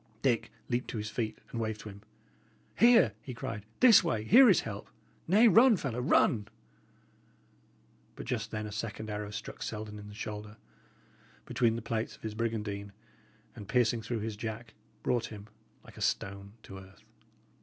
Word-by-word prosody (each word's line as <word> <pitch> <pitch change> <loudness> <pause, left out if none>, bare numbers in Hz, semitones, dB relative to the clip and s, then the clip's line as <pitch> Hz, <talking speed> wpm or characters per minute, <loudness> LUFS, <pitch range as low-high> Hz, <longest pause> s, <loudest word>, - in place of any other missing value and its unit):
Dick 125 -4 +1 0.2
leaped 120 +1 -1
to - - -4
his 105 0 -4
feet 110 -3 -3
and 115 - -3
waved 110 -1 -3
to 105 - -8
him. 100 0 -12 0.7
"Here!" 230 - +6
he 125 0 -8
cried. 110 -3 -6
"This 235 -7 +8
way! 115 -11 -1
here 245 - +7
is 190 - +5
help! 100 -3 -7 0.4
Nay, 210 +7 +6
run, 230 0 +6
fellow 125 -7 -3
run!" 110 -4 +3 1.7
But - - -8
just 115 -2 -3
then 110 -1 -4
a 105 - -6
second 110 0 -5
arrow 105 0 -4
struck 105 +2 -7
Selden 105 -1 -5
in 105 - -10
the 105 - -11
shoulder, 105 0 -7 0.9
between 115 -2 +1
the 115 - -5
plates 115 0 -3
of - - -24
his 110 -1 -4
brigandine, 105 -3 -3 0.6
and, 100 - -9
piercing 120 -2 +2
through 115 0 -3
his 110 0 -4
jack, 110 +1 -6 0.3
brought 120 -2 0
him, 105 -2 -10 0.4
like - - -15
a - - -9
stone, 100 +1 -2
to 95 -1 -10
earth. 95 +2 -16
110 Hz, 170 wpm, -31 LUFS, 105-120 Hz, 1.7 s, This